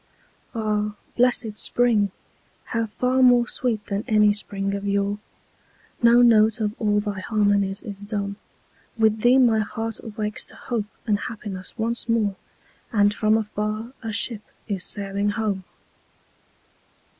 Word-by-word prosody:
Ah, 210 Hz, -1 st, -1 dB, 0.2 s
blessed 240 Hz, -3 st, +2 dB
spring!—how 230 Hz, 0 st, 0 dB
far 250 Hz, +4 st, 0 dB
more 245 Hz, -1 st, +5 dB
sweet 230 Hz, -6 st, -2 dB
than 200 Hz, +1 st, -3 dB
any 210 Hz, -3 st, +4 dB
spring 200 Hz, -1 st, -2 dB
of 200 Hz, 0 st, -4 dB
yore! 200 Hz, +1 st, 0 dB, 0.8 s
No 240 Hz, +1 st, +6 dB
note 220 Hz, -2 st, +5 dB
of 210 Hz, -1 st, -1 dB
all 210 Hz, -2 st, +2 dB
thy 205 Hz, -2 st, -4 dB
harmonies 205 Hz, -1 st, +1 dB
is 205 Hz, -4 st, -5 dB
dumb; 205 Hz, -1 st, -3 dB, 0.6 s
With 220 Hz, -1 st, +2 dB
thee 245 Hz, +3 st, +5 dB
my 235 Hz, -4 st, +4 dB
heart 225 Hz, +1 st, -3 dB
awakes 215 Hz, -2 st, -3 dB
to -, -, -13 dB
hope 230 Hz, -4 st, -3 dB, 0.2 s
and 210 Hz, -2 st, +1 dB
happiness 205 Hz, -6 st, -7 dB
once 230 Hz, +1 st, -1 dB
more, 215 Hz, -4 st, +1 dB, 0.6 s
And 205 Hz, -2 st, +3 dB
from 215 Hz, +1 st, +2 dB
afar 215 Hz, +2 st, -3 dB
a 225 Hz, -2 st, -4 dB
ship 215 Hz, +1 st, -2 dB, 0.3 s
is 195 Hz, -4 st, -2 dB
sailing 200 Hz, 0 st, +1 dB
home! 205 Hz, -3 st, -2 dB
215 Hz, 135 wpm, -23 LUFS, 205-230 Hz, 0.8 s, No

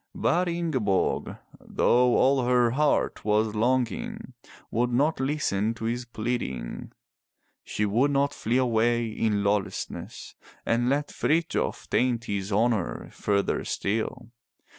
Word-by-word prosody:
But 180 Hz, +2 st, +1 dB
Ingeborg, 140 Hz, -, 0 dB, 0.2 s
though 125 Hz, 0 st, +2 dB
all 135 Hz, 0 st, +3 dB
her 125 Hz, -1 st, +3 dB
heart 150 Hz, +4 st, +1 dB
was 105 Hz, +1 st, +1 dB
longing, 120 Hz, +2 st, -1 dB, 0.4 s
would 120 Hz, +2 st, +1 dB
not 145 Hz, +6 st, +1 dB
listen 115 Hz, -6 st, 0 dB
to 110 Hz, -, -6 dB
his 120 Hz, +2 st, -2 dB
pleading. 110 Hz, -, -4 dB, 0.7 s
She 105 Hz, -, -2 dB
would 120 Hz, +8 st, +2 dB
not 140 Hz, 0 st, +1 dB
flee 115 Hz, +3 st, -1 dB
away 120 Hz, -1 st, +2 dB
in 110 Hz, -2 st, -1 dB
lawlessness 100 Hz, -1 st, -3 dB, 0.3 s
and 120 Hz, +2 st, +1 dB
let 145 Hz, +2 st, 0 dB
Frithjof 165 Hz, +2 st, -1 dB
taint 120 Hz, -2 st, +1 dB
his 100 Hz, -1 st, -3 dB
honor 110 Hz, -2 st, 0 dB
further 100 Hz, -1 st, 0 dB
still. 115 Hz, +3 st, -3 dB
120 Hz, 120 wpm, -26 LUFS, 110-130 Hz, 0.7 s, all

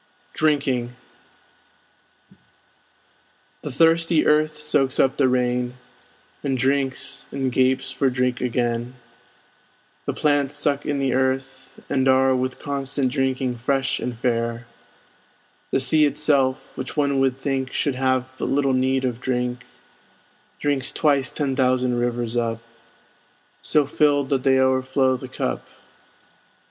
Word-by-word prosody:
DRINKING 135 Hz, -6 st, 0 dB, 2.7 s
The -, -, -5 dB
thirsty 165 Hz, +2 st, +3 dB
earth 155 Hz, +1 st, +4 dB
soaks 145 Hz, -3 st, +1 dB
up 135 Hz, -, +3 dB
the 135 Hz, -, +3 dB
rain, 125 Hz, -1 st, 0 dB, 0.7 s
And 135 Hz, -2 st, 0 dB
drinks, 135 Hz, +1 st, -1 dB
and 135 Hz, -2 st, -2 dB
gapes 130 Hz, +1 st, +1 dB
for 135 Hz, -, +1 dB
drink 125 Hz, 0 st, -1 dB
again, 120 Hz, 0 st, -1 dB, 1.1 s
The -, -, 0 dB
plants 145 Hz, -1 st, +1 dB
suck 145 Hz, -1 st, -1 dB
in 145 Hz, -1 st, 0 dB
the 135 Hz, -2 st, 0 dB
earth, 130 Hz, 0 st, -1 dB, 0.2 s
and 130 Hz, -1 st, +1 dB
are 130 Hz, 0 st, +4 dB
With 130 Hz, 0 st, -2 dB
constant 135 Hz, -2 st, -1 dB
drinking 130 Hz, -2 st, -1 dB
fresh 135 Hz, +2 st, 0 dB
and 125 Hz, -2 st, -4 dB
fair; 115 Hz, 0 st, -1 dB, 1.0 s
The -, -, +1 dB
sea 150 Hz, +4 st, +4 dB
itself 140 Hz, -3 st, 0 dB
(which 130 Hz, +4 st, -6 dB
one 140 Hz, -2 st, +1 dB
would 135 Hz, -1 st, +1 dB
think 135 Hz, -2 st, -2 dB
Should 140 Hz, -, 0 dB
have 130 Hz, 0 st, 0 dB
but -, -, -2 dB
little 135 Hz, -1 st, +1 dB
need 130 Hz, +1 st, +1 dB
of 125 Hz, -1 st, -3 dB
drink) 125 Hz, -1 st, -2 dB, 0.9 s
Drinks 140 Hz, -3 st, 0 dB
twice 140 Hz, -4 st, +1 dB
ten 140 Hz, -3 st, -2 dB
thousand 130 Hz, -2 st, +1 dB
rivers 120 Hz, -1 st, -2 dB
up, 115 Hz, -1 st, -1 dB, 1.0 s
So 150 Hz, -2 st, +2 dB
filled 145 Hz, -1 st, +1 dB
that 135 Hz, -3 st, +1 dB
they 130 Hz, 0 st, +3 dB
o'erflow 130 Hz, 0 st, +2 dB
the 125 Hz, -, -7 dB
cup. -, -, -4 dB
130 Hz, 125 wpm, -22 LUFS, 125-140 Hz, 2.7 s, earth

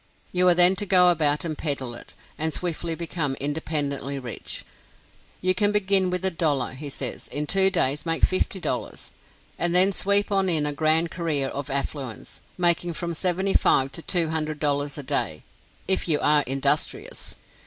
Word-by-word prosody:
You 180 Hz, 0 st, +2 dB
are 175 Hz, -, +6 dB
then 180 Hz, +2 st, +6 dB
to 205 Hz, -, -1 dB
go 180 Hz, -1 st, +6 dB
about 150 Hz, 0 st, +1 dB
and 160 Hz, -2 st, -3 dB
peddle 140 Hz, -6 st, -2 dB
it, 120 Hz, -, -12 dB, 0.2 s
and 160 Hz, +1 st, -1 dB
swiftly 170 Hz, 0 st, -2 dB
become 160 Hz, -4 st, -3 dB
independently 145 Hz, -1 st, -2 dB
rich. 125 Hz, -4 st, -7 dB, 0.8 s
You 185 Hz, 0 st, +2 dB
can 205 Hz, +3 st, +1 dB
begin 195 Hz, -2 st, +2 dB
with 180 Hz, +1 st, -3 dB
a 190 Hz, -, +1 dB
dollar, 150 Hz, -7 st, 0 dB
he 145 Hz, +3 st, -8 dB
says; -, -, -6 dB
in 150 Hz, +1 st, -3 dB
two 190 Hz, +5 st, +5 dB
days 150 Hz, -6 st, +2 dB
make 165 Hz, -1 st, 0 dB
fifty 185 Hz, +1 st, -2 dB
dollars, -, -, -5 dB, 0.5 s
and 175 Hz, +1 st, 0 dB
then 185 Hz, +2 st, +4 dB
sweep 200 Hz, +2 st, +1 dB
on 195 Hz, -1 st, +1 dB
in 155 Hz, -4 st, +2 dB
a 145 Hz, -, -2 dB
grand 160 Hz, +2 st, +3 dB
career 155 Hz, -6 st, -1 dB
of 140 Hz, 0 st, -6 dB
affluence, 135 Hz, -3 st, -5 dB, 0.2 s
making 175 Hz, -1 st, +2 dB
from 170 Hz, +1 st, -4 dB
$75 180 Hz, -6 st, +2 dB
to 165 Hz, -, -5 dB
$200 155 Hz, -4 st, 0 dB
a 145 Hz, -, -5 dB
day, 80 Hz, -, -2 dB, 0.4 s
"if 190 Hz, 0 st, +2 dB
you 155 Hz, -3 st, +3 dB
are 150 Hz, 0 st, +4 dB
industrious." 150 Hz, -, -2 dB
160 Hz, 165 wpm, -24 LUFS, 145-180 Hz, 0.8 s, are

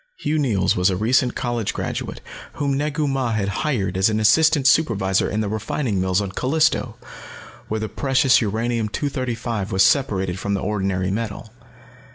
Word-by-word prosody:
Hugh 155 Hz, +1 st, -1 dB
Neils 115 Hz, -10 st, +1 dB
was 90 Hz, +2 st, +3 dB
a 95 Hz, -, 0 dB
recent 120 Hz, +5 st, +1 dB
college 120 Hz, -3 st, -2 dB
graduate -, -, -4 dB, 0.3 s
whom 140 Hz, -1 st, -1 dB
Negu 150 Hz, +1 st, -1 dB
Mah 135 Hz, -4 st, -1 dB
had 100 Hz, -3 st, -1 dB
hired 115 Hz, -, -1 dB
as 95 Hz, +3 st, +3 dB
an 110 Hz, 0 st, 0 dB
assistant 145 Hz, +6 st, +4 dB
supervisor 105 Hz, -10 st, +2 dB
in 110 Hz, -, -1 dB
the 105 Hz, -, -2 dB
refining 110 Hz, 0 st, -2 dB
mills 95 Hz, +1 st, +1 dB
on 100 Hz, -2 st, -4 dB
Callisto, 155 Hz, +9 st, 0 dB, 0.7 s
where 110 Hz, -, -2 dB
the 110 Hz, -, -3 dB
precious 135 Hz, +3 st, +2 dB
uranium 115 Hz, +1 st, -1 dB
235 115 Hz, -5 st, -3 dB
was 95 Hz, 0 st, +4 dB
separated 95 Hz, -7 st, +1 dB
from 100 Hz, +1 st, -1 dB
the -, -, -1 dB
ordinary 95 Hz, -3 st, -1 dB
metal. 110 Hz, 0 st, -5 dB
110 Hz, 165 wpm, -21 LUFS, 100-135 Hz, 0.7 s, assistant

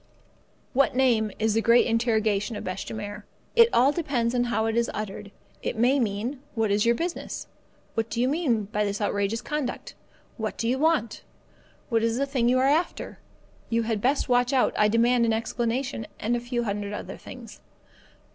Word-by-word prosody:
What 275 Hz, -1 st, +3 dB
name? 235 Hz, -5 st, +3 dB
is 220 Hz, 0 st, +1 dB
the 225 Hz, -, +2 dB
great 235 Hz, +1 st, +5 dB
interrogation 220 Hz, -2 st, +1 dB
of 205 Hz, -, -5 dB
bêche 185 Hz, -, -5 dB
de -, -, -5 dB
mer. 205 Hz, 0 st, -6 dB, 0.3 s
It 465 Hz, 0 st, +7 dB
all 260 Hz, +4 st, +4 dB
depends 270 Hz, -8 st, -1 dB
on 245 Hz, -1 st, +1 dB
how 230 Hz, -2 st, 0 dB
it 225 Hz, 0 st, 0 dB
is 235 Hz, 0 st, +1 dB
uttered. 205 Hz, -1 st, -5 dB, 0.3 s
It -, -, -3 dB
may 250 Hz, +5 st, +3 dB
mean: 230 Hz, +4 st, -2 dB, 0.2 s
What 220 Hz, -3 st, +1 dB
is 205 Hz, +3 st, +2 dB
your 235 Hz, -, +4 dB
business? 340 Hz, +6 st, -4 dB, 0.5 s
What 225 Hz, 0 st, -1 dB
do 230 Hz, -, -3 dB
you 250 Hz, -, +3 dB
mean 270 Hz, -7 st, +1 dB
by 210 Hz, +1 st, -1 dB
this 200 Hz, 0 st, -2 dB
outrageous 205 Hz, +1 st, -1 dB
conduct? 295 Hz, -4 st, -4 dB, 0.4 s
What 220 Hz, -2 st, -3 dB
do 230 Hz, -, -1 dB
you 255 Hz, +2 st, +1 dB
want? 305 Hz, -8 st, +1 dB, 0.7 s
What 230 Hz, -2 st, +2 dB
is 230 Hz, +1 st, +1 dB
the 275 Hz, -, +1 dB
thing 255 Hz, -4 st, +1 dB
you 255 Hz, -, +3 dB
are 260 Hz, -, +3 dB
after? 305 Hz, +6 st, 0 dB, 0.5 s
You 230 Hz, 0 st, +1 dB
had 220 Hz, -2 st, -1 dB
best 270 Hz, +6 st, +1 dB
watch 245 Hz, 0 st, +2 dB
out; 260 Hz, -, +3 dB
I 210 Hz, -, +4 dB
demand 235 Hz, +2 st, +3 dB
an 225 Hz, -, +2 dB
explanation; 235 Hz, +2 st, -2 dB
and 235 Hz, +3 st, 0 dB
a -, -, 0 dB
few 240 Hz, 0 st, -2 dB
hundred 205 Hz, -1 st, -3 dB
other -, -, -6 dB
things. -, -, -11 dB
230 Hz, 195 wpm, -26 LUFS, 215-255 Hz, 0.7 s, It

